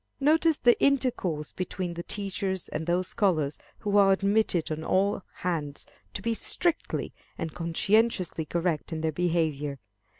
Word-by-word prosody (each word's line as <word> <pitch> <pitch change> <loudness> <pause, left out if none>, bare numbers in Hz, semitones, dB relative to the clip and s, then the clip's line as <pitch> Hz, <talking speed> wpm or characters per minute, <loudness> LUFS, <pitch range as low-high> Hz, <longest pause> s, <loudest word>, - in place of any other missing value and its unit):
Notice 315 +2 +4
the 240 -1 +3
intercourse 235 - +1
between 185 -1 -4
the 170 - -5
teachers 190 -1 -3
and 160 +2 -4
those 180 +1 0
scholars 160 -9 0 0.2
who 205 -1 0
are 195 -1 +6
admitted 195 -4 +1
on 155 +1 -3
all 195 +3 +1 0.2
hands 155 -5 -3 0.3
to 195 - -4
be 230 0 +1
strictly 340 +8 +1 0.2
and 165 -1 -4
conscientiously 180 0 +1
correct 170 -1 -1
in 160 -1 -3
their 160 0 0
behavior. 155 -4 -1
180 Hz, 140 wpm, -27 LUFS, 160-205 Hz, 0.3 s, are